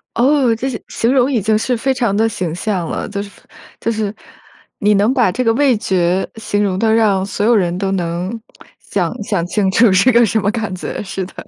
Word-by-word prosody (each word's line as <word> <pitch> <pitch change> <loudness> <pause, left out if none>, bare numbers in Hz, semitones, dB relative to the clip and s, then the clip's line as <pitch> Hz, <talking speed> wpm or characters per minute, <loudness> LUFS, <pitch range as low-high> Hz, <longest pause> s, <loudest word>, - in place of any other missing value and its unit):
哦， 260 -1 +3
这 260 +4 -3
形 235 - -5
形 235 +3 0
容 260 0 +3
已 240 -5 +1
经 215 +2 +2
是 245 +3 -1
非 265 +3 0
常 235 -6 0
地 220 +2 +2
形 180 -7 -3
象 185 -1 -2
了， - - -3
就 200 -1 -4
是 200 - -11 0.5
就 - - -2
是 215 -2 -2 0.7
你 210 0 +3
能 210 +5 +2
把 245 -8 +2
这 240 - -2
个 225 -2 +2
味 270 0 +3
觉 185 -2 0
形 205 -2 -2
容 190 -2 0
得 220 +2 +2
让 205 -4 +2
所 200 +1 -2
有 235 +1 +4
人 180 -4 +1
都 195 0 -2
能 180 +4 -3 0.4
想 - - -2
想 195 -5 -1
清 195 0 0
楚 230 +2 +4
是 195 +7 +4
个 235 0 +5
什 220 +1 0
么 205 0 0
感 220 -3 -3
觉 180 - -5
是 190 -1 -4
的。 185 - -13
210 Hz, 240 characters per minute, -17 LUFS, 190-230 Hz, 0.7 s, 个